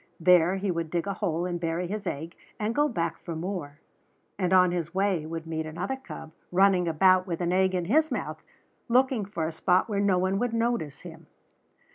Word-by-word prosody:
There 180 Hz, +1 st, +5 dB
he 195 Hz, 0 st, -1 dB
would 165 Hz, -2 st, -3 dB
dig 170 Hz, +2 st, -1 dB
a 200 Hz, -, -2 dB
hole 170 Hz, -2 st, -1 dB
and 175 Hz, -1 st, -3 dB
bury 170 Hz, +1 st, -2 dB
his 205 Hz, +3 st, -4 dB
egg 160 Hz, +5 st, -4 dB, 0.3 s
and 215 Hz, +1 st, -1 dB
go 295 Hz, +3 st, +3 dB
back 175 Hz, -, -2 dB
for 170 Hz, -, -6 dB
more; 160 Hz, -4 st, -5 dB, 0.6 s
and 185 Hz, -2 st, -1 dB
on 180 Hz, -1 st, +5 dB
his 175 Hz, 0 st, -3 dB
way 190 Hz, -5 st, +1 dB
would 165 Hz, 0 st, -5 dB
meet 160 Hz, -1 st, -3 dB
another 180 Hz, +11 st, -3 dB
cub 265 Hz, -11 st, -10 dB, 0.2 s
running 185 Hz, -1 st, +4 dB
about 185 Hz, +3 st, +4 dB
with 170 Hz, -2 st, -3 dB
an 175 Hz, 0 st, 0 dB
egg 190 Hz, 0 st, +2 dB
in 180 Hz, -2 st, -1 dB
his 310 Hz, -, +3 dB
mouth, 160 Hz, -, -4 dB, 0.5 s
looking 250 Hz, -2 st, +2 dB
for 170 Hz, -5 st, -3 dB
a -, -, -3 dB
spot 180 Hz, +3 st, +2 dB
where 205 Hz, -3 st, -1 dB
no 200 Hz, -2 st, +3 dB
one 190 Hz, +2 st, +1 dB
would 245 Hz, 0 st, -1 dB
notice 230 Hz, -, -1 dB
him. 165 Hz, -1 st, -12 dB
180 Hz, 205 wpm, -27 LUFS, 165-200 Hz, 0.6 s, There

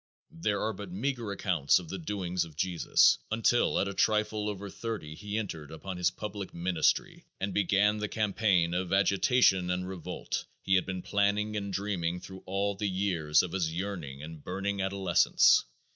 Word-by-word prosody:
There 135 Hz, -12 st, -1 dB
are 110 Hz, +1 st, 0 dB
but 100 Hz, -4 st, -8 dB
meagre 115 Hz, +2 st, -2 dB
accounts 90 Hz, -8 st, +2 dB
of 85 Hz, -3 st, -6 dB
the 95 Hz, -, -5 dB
doings 90 Hz, 0 st, -2 dB
of 80 Hz, -3 st, -11 dB
Jesus 90 Hz, +1 st, +3 dB
until 115 Hz, +2 st, +2 dB
at 100 Hz, -, +1 dB
a 100 Hz, -, -3 dB
trifle 105 Hz, 0 st, +1 dB
over 100 Hz, 0 st, -5 dB
thirty 105 Hz, -7 st, -5 dB
he 105 Hz, +5 st, -5 dB
entered 80 Hz, -9 st, -4 dB
upon 90 Hz, +4 st, -7 dB
his 90 Hz, -, +2 dB
public 105 Hz, -2 st, -7 dB
"ministry" 85 Hz, -1 st, 0 dB
and 100 Hz, 0 st, -2 dB
began 105 Hz, +1 st, +2 dB
the 105 Hz, -, -1 dB
campaign 100 Hz, -5 st, +1 dB
of 90 Hz, 0 st, -2 dB
agitation 100 Hz, -1 st, +3 dB
and 90 Hz, 0 st, -1 dB
revolt 95 Hz, -3 st, -5 dB, 0.2 s
he 95 Hz, -, +1 dB
had 95 Hz, -1 st, +3 dB
been 95 Hz, -1 st, -4 dB
planning 105 Hz, +1 st, +1 dB
and 100 Hz, -1 st, -3 dB
dreaming 90 Hz, -3 st, -2 dB
through 95 Hz, +1 st, -10 dB
all 100 Hz, +2 st, 0 dB
the 100 Hz, +1 st, -2 dB
years 90 Hz, -6 st, +2 dB
of 90 Hz, -, -4 dB
his 85 Hz, -4 st, -1 dB
yearning 85 Hz, -6 st, -5 dB
and 80 Hz, -1 st, -9 dB
burning 100 Hz, +2 st, -2 dB
adolescence. 95 Hz, -2 st, +4 dB
95 Hz, 175 wpm, -30 LUFS, 90-105 Hz, 0.2 s, adolescence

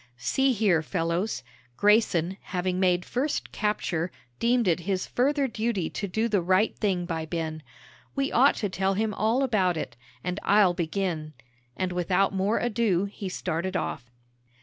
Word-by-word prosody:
"See 265 Hz, -, +2 dB
here, 200 Hz, -7 st, +3 dB
fellows." 170 Hz, -1 st, -1 dB, 0.3 s
Grayson, 195 Hz, -4 st, +3 dB
having 180 Hz, 0 st, -2 dB
made 180 Hz, -1 st, +2 dB
first 275 Hz, +4 st, -2 dB
capture, 180 Hz, -5 st, -1 dB, 0.3 s
deemed 235 Hz, -2 st, +2 dB
it 170 Hz, -1 st, +3 dB
his 185 Hz, +1 st, -1 dB
further 275 Hz, +2 st, +1 dB
duty 220 Hz, -7 st, -2 dB
to 200 Hz, -, -3 dB
do 220 Hz, +5 st, 0 dB
the 205 Hz, -5 st, +1 dB
right 185 Hz, +5 st, +2 dB
thing 190 Hz, -4 st, 0 dB
by 165 Hz, -2 st, -3 dB
Ben. 160 Hz, -1 st, -3 dB, 0.5 s
"We 275 Hz, 0 st, 0 dB
ought 270 Hz, +4 st, +5 dB
to 205 Hz, -, -1 dB
tell 190 Hz, +1 st, 0 dB
him 215 Hz, +1 st, 0 dB
all 225 Hz, +7 st, +1 dB
about 190 Hz, -9 st, +2 dB
it. 125 Hz, -6 st, -5 dB, 0.3 s
And 180 Hz, +2 st, -2 dB
I'll 200 Hz, -3 st, +4 dB
begin," 165 Hz, -2 st, -2 dB, 0.4 s
and 185 Hz, -1 st, -1 dB
without 180 Hz, +2 st, +1 dB
more 195 Hz, +3 st, +1 dB
ado, 215 Hz, -6 st, +1 dB
he 200 Hz, -1 st, -6 dB
started 185 Hz, +1 st, -2 dB
off. 125 Hz, -4 st, -4 dB
190 Hz, 155 wpm, -27 LUFS, 175-220 Hz, 0.5 s, ought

